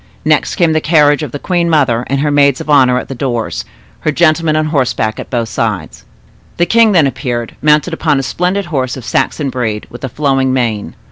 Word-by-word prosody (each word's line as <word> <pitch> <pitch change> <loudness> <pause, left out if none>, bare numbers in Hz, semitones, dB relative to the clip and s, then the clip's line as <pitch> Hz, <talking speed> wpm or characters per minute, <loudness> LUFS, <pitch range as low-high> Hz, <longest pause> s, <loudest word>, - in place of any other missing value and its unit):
Next - - +1
came 170 -5 +2
the 155 - +1
carriage 150 -2 +3
of 150 -5 -5
the 145 - -4
queen 170 +2 -1
mother, 130 -7 +1
with 135 +1 0
her 150 0 0
maids 140 -2 +3
of 150 - -4
honor 130 -3 +4
at - - -4
the - - -6
doors, 120 -3 -3 0.3
her 155 - -1
gentlemen 155 0 +2
on 155 0 +1
horseback 125 -7 -1
at - - -7
both 120 -3 -1
sides. - - -3 0.5
The 175 - +2
king 225 +2 +4
then 165 -5 +4
appeared, 125 -3 -3
mounted 150 +3 +2
upon 155 -3 +1
a 135 - -1
splendid 180 +7 -1
horse 135 -6 -2
of 125 - -9
Saxon 140 +2 -1
breed, 115 -4 -3
with 120 - -11
a 130 - -3
flowing 135 -1 0
mane. 115 -5 -2
140 Hz, 210 wpm, -14 LUFS, 125-155 Hz, 0.5 s, honor